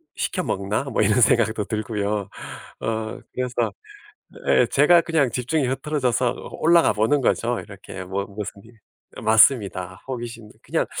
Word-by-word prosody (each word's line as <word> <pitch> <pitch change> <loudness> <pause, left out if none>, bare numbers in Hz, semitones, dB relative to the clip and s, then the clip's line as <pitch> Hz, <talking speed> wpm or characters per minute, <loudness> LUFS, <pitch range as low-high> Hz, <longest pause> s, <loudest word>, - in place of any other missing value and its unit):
시켜 185 - -2
먹나?' 100 - -2
뭐 135 -5 0
이런 105 +4 +3
생각도 110 -2 +3
들고요. 105 -1 -2 0.5
어 110 -1 -3 0.2
그래서 125 -1 -1 0.8
예 - - +4
제가 160 +5 +5
그냥 160 -7 +1
집중이 135 +4 0
흐트러져서 130 -2 0
어 - - -6
올라가 170 +1 +5
보는 110 +7 +2
거죠. 120 -1 +1
이렇게 95 -2 -9
뭐 95 +2 -3
무슨 100 -1 -7
일 115 0 -18 0.4
예 - - -7
맞습니다. 100 -5 +3
호기심 120 -4 -6
그냥 - - -1
115 Hz, 300 characters per minute, -23 LUFS, 105-130 Hz, 0.8 s, 제가